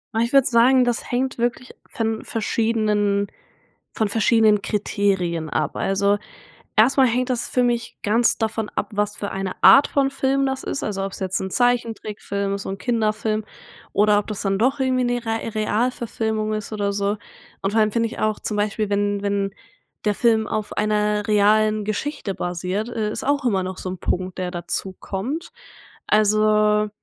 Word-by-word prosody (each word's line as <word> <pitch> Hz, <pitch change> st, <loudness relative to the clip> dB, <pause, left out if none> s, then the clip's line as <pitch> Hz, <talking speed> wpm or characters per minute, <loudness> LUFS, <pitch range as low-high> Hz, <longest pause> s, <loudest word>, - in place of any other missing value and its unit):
Ah, -, -, +2 dB
ich 235 Hz, +3 st, 0 dB
würde 275 Hz, -1 st, +6 dB
sagen, 250 Hz, +2 st, +5 dB
das 240 Hz, -1 st, -1 dB
hängt 260 Hz, +1 st, -1 dB
wirklich 240 Hz, +1 st, -2 dB, 0.2 s
von 225 Hz, -1 st, -2 dB
verschiedenen 210 Hz, -2 st, 0 dB, 0.7 s
von 220 Hz, -, 0 dB
verschiedenen 215 Hz, -1 st, +3 dB
Kriterien 190 Hz, -6 st, -1 dB
ab. 150 Hz, 0 st, -1 dB
Also, 200 Hz, +1 st, +1 dB, 0.6 s
erstmal 260 Hz, +4 st, +5 dB
hängt 250 Hz, +2 st, 0 dB
das 240 Hz, -1 st, -2 dB
für 250 Hz, -, +2 dB
mich 235 Hz, -1 st, -1 dB
ganz 230 Hz, +3 st, +3 dB
davon 220 Hz, -1 st, -2 dB
ab, 200 Hz, -, -3 dB
was 210 Hz, 0 st, -1 dB
für 200 Hz, -, -4 dB
eine 195 Hz, -1 st, -4 dB
Art 275 Hz, -, +8 dB
von 275 Hz, -1 st, +1 dB
Film 275 Hz, 0 st, +1 dB
das 265 Hz, 0 st, -3 dB
ist. -, -, -3 dB
Also 195 Hz, -2 st, -2 dB
ob's 195 Hz, -, -7 dB
jetzt 190 Hz, -1 st, -2 dB
'n 190 Hz, -, -3 dB
Zeichentrickfilm 220 Hz, -5 st, -1 dB
ist, 200 Hz, -, -5 dB
so -, -, -6 dB
'n 195 Hz, -, -4 dB
Kinderfilm 215 Hz, 0 st, 0 dB, 0.5 s
oder 205 Hz, 0 st, +4 dB
ob 210 Hz, -, -6 dB
das 210 Hz, -2 st, -4 dB
dann 195 Hz, -1 st, 0 dB
doch 265 Hz, +5 st, +2 dB
irgendwie 255 Hz, -1 st, +1 dB
'ne 245 Hz, -1 st, -1 dB
Re 225 Hz, 0 st, -3 dB
Realverfilmung 220 Hz, -1 st, -1 dB
ist 215 Hz, 0 st, -4 dB
oder 200 Hz, -1 st, -1 dB
so. 200 Hz, +1 st, -1 dB, 0.5 s
Und 195 Hz, -, 0 dB
vor 220 Hz, -, +2 dB
allem 215 Hz, -, +2 dB
finde 230 Hz, +1 st, +1 dB
ich -, -, -9 dB
auch 215 Hz, -1 st, 0 dB
zum 210 Hz, -, -3 dB
Beispiel, 210 Hz, 0 st, -1 dB
wenn 205 Hz, 0 st, 0 dB
wenn 200 Hz, -1 st, -1 dB, 0.5 s
der 210 Hz, -, +3 dB
Film 220 Hz, -2 st, +2 dB
auf 215 Hz, -1 st, -3 dB
einer 210 Hz, -1 st, +1 dB
realen 215 Hz, 0 st, +3 dB
Geschichte 215 Hz, -1 st, -3 dB
basiert, 180 Hz, +5 st, -3 dB
äh, 220 Hz, -3 st, -2 dB
ist -, -, -5 dB
auch 285 Hz, 0 st, +1 dB
immer 195 Hz, -6 st, +1 dB
noch 185 Hz, 0 st, -5 dB
so 185 Hz, -, -5 dB
'n 185 Hz, -, -5 dB
Punkt, 185 Hz, 0 st, -2 dB
der 180 Hz, -1 st, -2 dB
dazukommt. 195 Hz, -, -4 dB, 0.6 s
Also, 215 Hz, 0 st, +3 dB
215 Hz, 175 wpm, -22 LUFS, 200-235 Hz, 0.7 s, Art